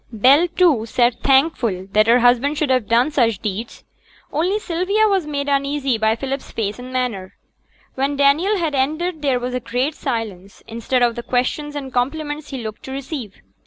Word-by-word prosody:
Bell, 265 +10 +5
too, 325 -10 +2
sate 240 +1 +2
thankful 265 - +2
that 215 +1 +3
her 235 +1 +5
husband 250 +5 +3
should 295 -3 0
have 255 -4 +1
done 240 +6 +3
such 235 -7 +2
deeds. 210 +4 -5 0.5
Only 355 +7 +1
Sylvia 395 +3 +1
was 385 -6 0
made 285 -1 -3
uneasy 275 -3 0
by 220 0 +2
Philip's 270 +2 -5
face 210 0 -3
and 250 +1 -9
manner. 235 -8 -3 0.6
When 275 +2 -1
Daniel 295 +9 +3
had 330 -4 -1
ended 310 +5 -1
there 270 -4 +1
was 250 +1 -4
a 250 - -1
great 250 +5 -2
silence, 220 -9 -5
instead 235 +2 -1
of 240 -1 +3
the 240 - -5
questions 255 +5 -2
and 270 -3 -6
compliments 295 +4 -2
he 265 -4 -6
looked 215 -1 -7
to 265 - -7
receive. 265 - -6
265 Hz, 180 wpm, -20 LUFS, 235-295 Hz, 0.6 s, Bell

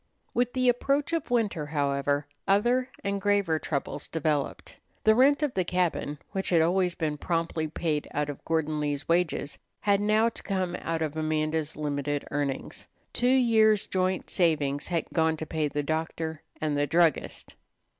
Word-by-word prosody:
With 245 0 +1
the 255 -1 +1
approach 275 +5 +1
of 330 -3 -1
winter, 210 -11 0
however, 145 -1 0 0.2
other 240 +6 +3
and 200 0 -1
graver 200 -6 +2
troubles 140 -3 -3
developed. 155 -3 -2 0.2
The 220 - +6
rent 280 +6 +4
of 290 -4 0
the 185 - +1
cabin, 175 -4 -1
which 190 0 -2
had 170 - +4
always 180 +2 +2
been 150 -3 -2
promptly 165 -1 -1
paid 155 -1 -2
out 150 0 -1
of 145 -2 -7
Gordon 155 -2 0
Lee's 145 -1 -2
wages, 165 -4 0 0.2
had 200 -1 +3
now 215 +2 +3
to - - -10
come 185 -3 -2
out 165 -1 -2
of 155 -1 -3
Amanda's 155 0 -1
limited 145 -1 -2
earnings. 140 -2 -3 0.3
Two 245 - +1
years' 225 -5 +4
joint 185 0 -1
savings 145 -5 +1
had 170 -2 -1
gone 160 -1 +2
to 160 - -4
pay 155 -1 -1
the 145 0 -2
doctor 160 +1 -3 0.2
and 155 -2 -1
the 145 0 +1
druggist. 165 0 +1
165 Hz, 165 wpm, -28 LUFS, 150-200 Hz, 0.3 s, The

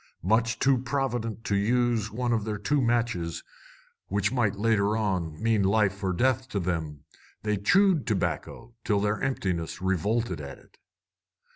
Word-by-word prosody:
Much 115 +5 +2
too 135 -2 +3
provident 120 -4 -2
to 100 - 0
use 115 +1 +1
one 120 +2 -1
of 110 -2 0
their 105 -1 -3
two 140 +8 +1
matches, 115 -8 0 0.6
which 100 +2 0
might, 110 -6 +1
later 105 0 +2
on, 90 -7 -2
mean 110 -2 +2
life 100 0 +1
or 95 - +1
death 130 +6 +1
to 100 - -2
them, 80 -5 -3 0.4
they 105 0 +1
chewed 175 - +3
tobacco 115 +2 -2
till 105 -1 +1
their 105 +1 0
emptiness 90 -12 -2
revolted 95 0 -1
at 70 -1 -8
it. - - -23
110 Hz, 150 wpm, -27 LUFS, 95-120 Hz, 0.6 s, too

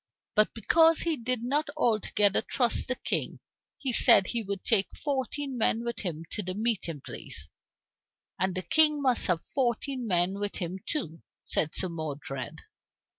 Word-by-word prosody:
But 215 0 +2
because 325 +7 +4
he 335 -2 0
did 250 -2 -2
not 290 +5 0
altogether 210 -5 +2
trust 245 -3 +2
the 255 - -1
King - - -2 0.4
he 265 -3 -3
said 195 - +6
he 235 +4 -2
would 200 -2 -5
take 200 -5 +2
fourteen 275 -2 -3
men 225 +1 +1
with 235 -1 -4
him 165 -5 -4
to - - -3
the 185 -1 -5
meeting 205 - -2
place, 80 - -9 0.9
"and 190 +1 0
the 185 - -3
King 300 - +5
must 255 -3 +3
have 175 -3 0
fourteen 255 0 -1
men 180 +1 +1
with 205 0 -3
him 180 +1 -4
too," 165 - -4 0.2
said 155 -1 -1
Sir 185 - +1
Modred. 145 -5 -6
220 Hz, 160 wpm, -28 LUFS, 185-255 Hz, 0.9 s, said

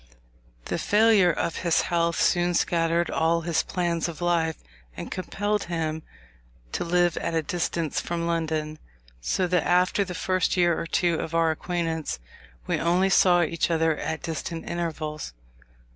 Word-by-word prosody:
The - - -2
failure 210 -4 +4
of 165 +1 -2
his 170 -3 +2
health 170 -1 0
soon 175 0 +2
scattered 170 0 +1
all 165 +1 +1
his 165 -1 +1
plans 175 -2 -1
of 170 -3 -7
life, 170 -2 +1 0.4
and - - -6
compelled 205 +2 -2
him 160 -2 -2 0.7
to - - -2
live 175 0 +2
at 165 - -2
a 160 - +1
distance 165 -1 -2
from 170 -1 -3
London, 160 -2 -2 0.4
so 180 - 0
that 180 -1 +2
after 180 +3 +2
the 180 -2 -6
first 185 +1 0
year 175 -2 +3
or 165 - -4
two 170 -1 +1
of 165 - -4
our 165 -1 +3
acquaintance, 165 -1 -3 0.5
we - - -1
only 180 +3 +2
saw 175 -2 +5
each 165 +1 -1
other 160 -1 +2
at 160 +1 -4
distant 165 0 -5
intervals. 155 - -4
170 Hz, 155 wpm, -25 LUFS, 160-175 Hz, 0.7 s, saw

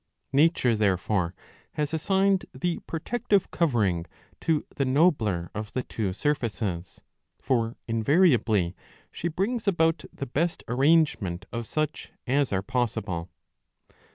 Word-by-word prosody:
Nature 140 -5 +4
there 100 -3 +2
fore 95 -2 -1 0.4
has 150 0 -2
assigned 190 +4 +2
the 170 +6 -1
protective 205 +4 0
covering 105 - +1 0.3
to 160 -2 0
the 140 - +2
nobler 130 - +2
of 105 +1 -5
the 130 - -1
two 105 -4 -3
surfaces 105 - -2 0.4
;2 - - -35
for 115 -3 +1
invariably 115 - +3 0.4
she 170 - -3
brings 205 +8 -1
about 165 -4 +2
the 140 - -5
best 165 +7 -1
arrangement 130 - +2
of 115 -1 -4
such 155 0 -2 0.2
as 135 +1 +1
are 95 -1 0
possible. 110 -8 -2
130 Hz, 125 wpm, -27 LUFS, 105-160 Hz, 0.4 s, Nature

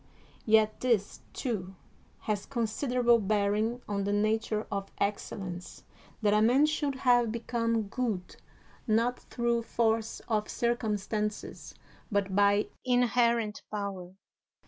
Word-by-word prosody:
Yet 215 -1 +4
this, 230 -5 0
too, 195 -7 -4 0.5
has 210 -2 -2
considerable 240 0 +2
bearing 215 +3 0
on 200 -1 -1
the 200 - -1
nature 215 +1 0
of 195 -1 -3
excellence, 190 -3 -4 0.4
that 205 -1 +4
a 210 - +4
man 250 +7 +5
should 295 -2 -1
have 245 -3 +3
become 230 -1 -1
good 205 -3 -3 0.5
not 230 +3 +2
through 235 -1 -1
force 225 -1 0
of 215 -2 0
circumstances 215 -3 -2 0.4
but 200 -2 0
by 205 +1 +3
inherent 235 -3 +2
power. 195 -3 -5
220 Hz, 110 wpm, -30 LUFS, 205-235 Hz, 0.5 s, man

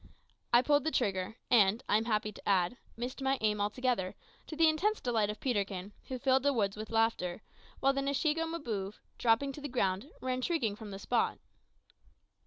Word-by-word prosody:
I 240 +1 +6
pulled 290 0 +3
the 315 - +1
trigger, 200 -7 -1 0.2
and, 215 -2 +5
I - - +3
am 220 +1 +2
happy 215 -2 0
to 205 - -7
add, 185 +2 +3 0.2
missed 245 +3 -5
my 270 0 +1
aim 210 -1 +1
altogether, 210 -3 0 0.3
to 315 - -6
the 325 +1 +5
intense 390 +8 +2
delight 225 -4 +1
of 210 - -4
Peterkin, 200 -5 -2
who 260 - -3
filled 265 +1 +3
the 285 +1 +2
woods 205 -5 0
with 215 0 -7
laughter, 225 -4 0 0.4
while 275 0 +4
the 275 - -1
Nshiego 300 +4 0
Mbouve, 220 -12 -4 0.2
dropping 240 +4 +3
to 290 - -9
the 290 - -4
ground, 200 0 0
ran 255 0 -2
shrieking 255 - 0
from 215 0 -9
the 195 - -6
spot. 235 +4 0
235 Hz, 190 wpm, -32 LUFS, 205-275 Hz, 0.4 s, I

